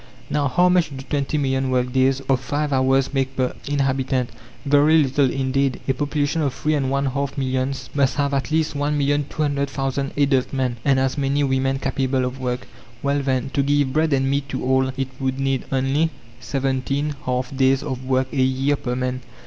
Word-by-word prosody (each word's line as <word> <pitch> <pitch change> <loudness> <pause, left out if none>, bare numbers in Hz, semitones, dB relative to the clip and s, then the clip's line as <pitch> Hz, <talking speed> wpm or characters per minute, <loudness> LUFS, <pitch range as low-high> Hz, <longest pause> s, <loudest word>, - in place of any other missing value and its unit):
Now, 145 -1 +1
how 175 +8 +3
much 180 -3 +3
do 135 -2 -8
twenty 145 +1 -1
million 135 -2 0
work 125 -1 0
days 135 +1 +2
of 135 -1 +1
five 145 +3 -2
hours 135 +1 +2
make 135 -1 -1
per 130 -1 0
inhabitant? 135 -3 0 0.3
Very 145 +3 +5
little 135 0 +2
indeed. 135 0 0
A 135 - +3
population 145 +3 -1
of 140 -4 -1
three 155 +3 0
and 135 -3 0
one 140 +1 0
half 140 +1 -2
millions 130 0 -2
must 140 -2 +2
have 140 -1 0
at 135 -1 -1
least 160 0 +1
1,200,000 140 -1 -1
adult 140 -3 +2
men, 130 -3 -1
and 135 -1 +3
as 130 +2 0
many 140 +1 +1
women 135 0 +1
capable 135 -1 0
of 125 +1 -5
work. 125 -1 -3 0.4
Well, 140 0 +1
then, 135 -1 -1
to 140 - +1
give 140 -1 +1
bread 155 +1 +2
and 135 -1 +2
meat 140 0 -1
to - - -3
all, 130 0 +3
it 135 -1 -2
would 130 0 -1
need 135 -1 0
only 135 +4 +1 0.3
seventeen 135 +2 -1
half 125 +1 -2
days 135 0 +3
of 130 0 -4
work 130 0 0
a 135 - +1
year 135 +2 +1
per 125 -2 -3
man. 130 0 -2
135 Hz, 190 wpm, -22 LUFS, 130-140 Hz, 0.4 s, Very